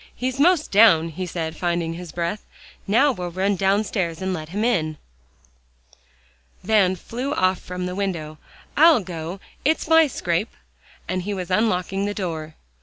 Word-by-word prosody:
"He's 255 +1 -3
'most 330 +1 +3
down," 195 -6 +6
he 180 +3 -5
said, 160 -2 -4
finding 170 -1 -1
his 175 -1 -8
breath. 175 +5 -3 0.4
"Now 250 +8 +4
we'll 180 -7 -5
run 190 +3 0
downstairs 190 -3 0
and 190 0 -2
let 155 -3 -5
him 205 +5 -2
in." 155 -10 0 1.7
Van 195 -4 +3
flew 250 - -4
off 185 0 +2
from 180 0 -5
the 180 - -3
window. 170 -6 -3 0.4
"I'll 315 -4 +6
go; 175 0 -6 0.2
it's 315 +3 +1
my 320 0 +6
scrape," 175 -4 -2 0.5
and 185 0 -1
he 200 +3 -3
was 185 -1 -5
unlocking 195 -1 +1
the 205 0 -3
door. 160 -5 -4
185 Hz, 155 wpm, -23 LUFS, 170-215 Hz, 1.7 s, down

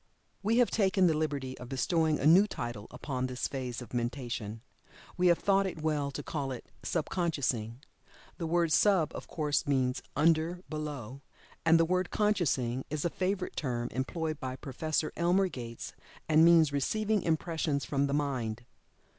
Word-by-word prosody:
We 220 +3 +2
have 245 -1 +4
taken 190 -3 +3
the 165 - +4
liberty 140 -4 -2
of 125 - -9
bestowing 160 +3 +1
a - - -1
new 180 +7 +7
title 120 - -5
upon 130 0 -3
this 125 -1 -2
phase 125 -3 -4
of 120 - -15
mentation 120 -3 -3 0.5
we 180 0 +3
have 170 -1 +5
thought 195 -1 +2
it 165 -4 -6
well 150 -3 0
to 140 - -6
call 140 -4 -3
it 125 - -8
"Sub 160 -4 -1
consciousing." 130 - -1 0.6
The 165 - -2
word 170 0 +2
"Sub," 180 -4 +4
of - - -7
course 150 -1 -1
means 130 -2 +1
"under; 165 +3 +2
below;" 140 -5 -5 0.4
and 165 0 +5
the 165 - +4
word 185 +1 0
"Consciousing" 140 - +1
is 150 +1 -2
a 170 - +1
favorite 185 0 -2
term 120 -4 -2
employed 155 +3 -3
by 130 -1 -4
Prof. 150 +4 -2
Elmer 180 +3 +3
Gates, 115 -6 -7 0.3
and 155 0 +5
means 165 -3 +6
receiving 210 +9 +1
impressions 160 -3 -1
from 140 0 +1
the 140 - -2
mind. 120 -6 -2
150 Hz, 165 wpm, -31 LUFS, 130-170 Hz, 0.6 s, new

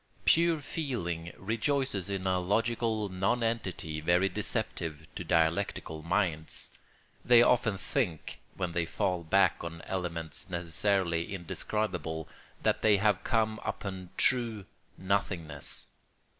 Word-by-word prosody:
Pure 165 -1 +4
feeling 85 - -3
rejoices 115 - -1
in 95 -1 -2
a 95 -1 +2
logical 110 +3 0
nonentity 95 -5 -1
very 90 +4 +3
deceptive 80 -4 -2
to - - -4
dialectical 80 -1 +1
minds. 85 -2 -1 0.5
They 120 -1 +7
often 120 -5 +3
think, 95 - -2 0.2
when 90 -3 -2
they 85 -1 0
fall 90 +1 -1
back 95 +3 +3
on 85 0 -6
elements 85 -4 -3
necessarily 85 0 0
indescribable, 85 -3 -2 0.4
that - - +2
they 105 -2 +5
have 105 -1 +2
come 110 -2 +1
upon 95 -3 -4
true 115 -6 +2 0.3
nothingness. 90 -7 -2
95 Hz, 110 wpm, -30 LUFS, 85-110 Hz, 0.5 s, They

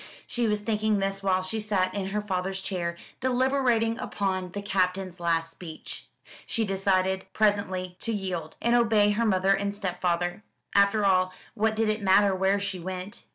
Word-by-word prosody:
She 240 -1 -1
was 210 -1 0
thinking 215 -1 +1
this 195 0 -1
while 185 -1 +1
she 220 +4 -2
sat 195 -3 0
in 195 -2 -2
her 210 +2 -1
father's 190 -1 -2
chair, 170 -3 -2 0.2
deliberating 255 -3 +2
upon 190 -2 -2
the 205 - -4
Captain's 185 -2 0
last 165 -1 0
speech. 165 -1 -9 0.4
She 225 -2 0
decided 190 -1 +1
presently 190 -4 0
to 230 - -2
yield, 185 -6 -4
and 235 - +3
obey 220 -3 +4
her 225 +3 +1
mother 190 -1 +3
and 200 +1 -1
stepfather. 180 -1 -1 0.3
After 200 +1 +4
all, 185 -1 +3 0.2
what 220 0 +1
did 225 0 +1
it 215 0 0
matter 200 0 +5
where 190 +1 +2
she 200 -2 -2
went? 185 +4 -6
195 Hz, 165 wpm, -27 LUFS, 185-215 Hz, 0.4 s, matter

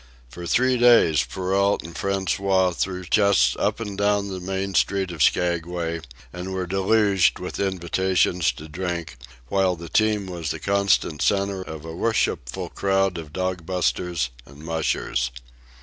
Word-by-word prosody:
For 85 +7 -8
three 130 +3 +2
days 115 -12 +5
Perrault 95 +2 0
and 85 - -9
François 95 -1 0
threw 90 0 -2
chests 100 +2 +3
up - - 0
and 105 -3 -5
down 100 0 +1
the 95 -1 -5
main 95 +1 -3
street 95 -1 +1
of 85 -4 -6
Skaguay 85 +1 +1 0.3
and 90 +2 -6
were 95 -1 -2
deluged 95 +1 +2
with 90 0 -6
invitations 95 -2 +1
to 75 - -10
drink, 85 -2 -4 0.3
while 95 -2 +2
the 85 0 -9
team 110 0 +2
was 85 -4 -5
the - - -3
constant 100 -6 +1
centre 100 -1 +1
of 80 -4 -8
a 80 0 -7
worshipful 90 - -1
crowd 95 -2 0
of 80 -3 -9
dog 90 +1 -2
busters 90 -6 -1 0.2
and 70 +3 -14
mushers. 80 -6 -1
95 Hz, 150 wpm, -23 LUFS, 85-100 Hz, 0.3 s, days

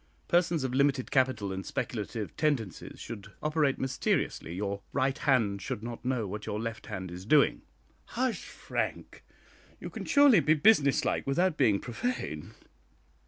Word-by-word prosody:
"Persons 170 -3 +2
of 130 -1 -2
limited 140 -1 +2
capital 130 -7 +1
and 95 0 -4
speculative 110 -2 -4
tendencies 135 - -2
should 100 -3 -8
operate 150 -3 +1
mysteriously. 130 -9 -1
Your 100 +1 -3
right 135 -1 +1
hand 115 -10 +1
should 120 -3 -4
not 115 0 -6
know 125 -3 0
what 105 +2 -6
your 105 - -2
left 115 -1 -5
hand 95 -1 -5
is 90 +1 -7
doing." 145 +8 +4 0.4
"Hush, 255 -2 -2
Frank! - - -4 0.6
you - - -7
can - - -6
surely 280 - +6
be 155 +1 +3
business 150 -5 +4
like - - -1
without 175 +5 +2
being 110 -9 +3
profane. 120 - -4
130 Hz, 150 wpm, -29 LUFS, 105-150 Hz, 0.6 s, surely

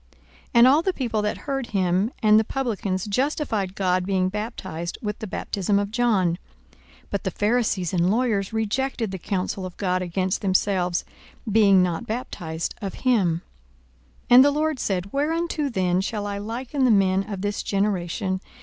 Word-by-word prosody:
42:007:029 - - -32 0.3
And 235 +1 +8
all 285 +4 +5
the 380 +2 0
people 230 -7 -1
that 210 0 -1
heard 270 -3 -3
him, 190 +2 +1
and 215 0 +6
the - - +2
publicans, 210 -7 -2
justified 215 -4 -1
God, 185 -1 +1
being 185 -1 +1
baptized 190 -5 -5
with 210 -1 -3
the 220 - -5
baptism 200 +1 -1
of 200 0 -1
John. 210 -8 +1 0.3
42:007:030 - - -27 0.3
But 200 - -2
the - - 0
Pharisees 205 -3 0
and 175 0 +2
lawyers 215 -3 +1
rejected 225 +1 -1
the 190 - -5
counsel 190 +1 -2
of 185 -1 -7
God 185 -2 0
against 185 +2 -1
themselves, 185 -2 +1 0.5
being 200 -3 +5
not 180 +5 -2
baptized 170 -8 -4
of 195 -2 -4
him. 185 -10 +2 0.8
42:007:031 - - -35
And 250 +2 +10
the - - +6
Lord 305 -1 0
said, 195 -2 -2
Whereunto 310 +1 0
then 185 -5 +1
shall 205 +1 -3
I 200 0 -3
liken 245 +6 -3
the 255 - +5
men 195 -3 +4
of 195 -2 -4
this 205 0 -2
generation? 190 -1 -1
200 Hz, 170 wpm, -24 LUFS, 185-235 Hz, 0.8 s, And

